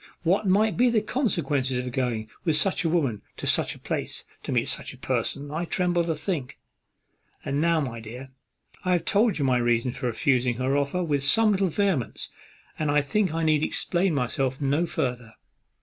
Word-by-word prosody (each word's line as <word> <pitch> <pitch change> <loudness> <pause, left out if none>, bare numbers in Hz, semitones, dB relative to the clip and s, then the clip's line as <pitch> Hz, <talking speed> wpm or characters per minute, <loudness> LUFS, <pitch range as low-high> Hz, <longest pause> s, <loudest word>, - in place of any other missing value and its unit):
What 195 +5 +2
might 210 +3 +3
be 245 +1 +5
the 230 -2 +3
consequence 170 - 0
of 125 -1 -2
going 120 -4 -1 0.2
with 160 -4 +2
such 185 +5 +1
a 165 - +1
woman 140 -11 0 0.2
to - - -5
such - - +2
a - - -15
place, - - -3 0.2
to - - -5
meet - - +1
such - - -1
a - - -18
person, 145 +1 -2
I 165 +3 -2
tremble 175 0 +1
to 165 -1 -1
think. 150 -5 -4 0.9
And 140 +1 0
now, 165 0 +3
my 120 -5 -4
dear, 120 +4 -9 0.5
I 185 -1 +2
have 170 -2 0
told 215 -1 +2
you 145 - 0
my 130 -2 +3
reason 120 0 +1
of - - -10
refusing 125 0 +1
her 130 +3 0
offer 145 +6 0
with 145 -4 0
some 215 +10 +4
little 195 -1 +2
vehemence, 180 - -1 0.5
and 155 -1 0
I 145 0 +4
think 190 +6 0
I 165 +1 -1
need 155 -2 +3
explain 175 0 0
myself 130 0 -1
no 145 +4 +1
farther." 125 -6 -3
150 Hz, 195 wpm, -26 LUFS, 130-180 Hz, 0.9 s, be